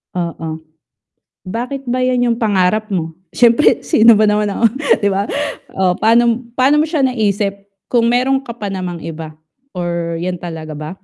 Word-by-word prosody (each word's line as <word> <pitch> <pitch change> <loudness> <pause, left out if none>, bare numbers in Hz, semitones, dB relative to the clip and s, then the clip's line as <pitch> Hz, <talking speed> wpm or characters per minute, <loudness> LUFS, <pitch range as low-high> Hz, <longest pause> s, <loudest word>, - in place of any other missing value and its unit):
Oo, 165 -2 -4 0.9
bakit 250 +6 -5
ba 255 +1 0
'yan 250 -1 +1
yung 230 - +1
pangarap 210 0 +1
mo? 165 -3 -3 0.2
Siyempre 240 +4 +4
sino 230 -6 +5
ba 215 -1 +4
naman 210 0 +1
ako, 230 - -2 0.4
'di 205 - +2
ba? 200 0 0 0.5
O 185 -2 +1
pa'no 235 +2 +3
pa'no 260 +4 +3
mo 300 - +3
siya 315 -2 -1
naisip, 205 -5 -1 0.2
kung 235 -1 +2
meron 265 +2 +1
ka 235 - -6
pa 215 -3 -6
namang 185 -3 -5
iba, 160 -1 -7 0.4
or 170 -2 -3
'yan 180 +1 -2
talaga 160 -3 -7
ba? 150 +1 -6
210 Hz, 165 wpm, -17 LUFS, 175-240 Hz, 0.9 s, sino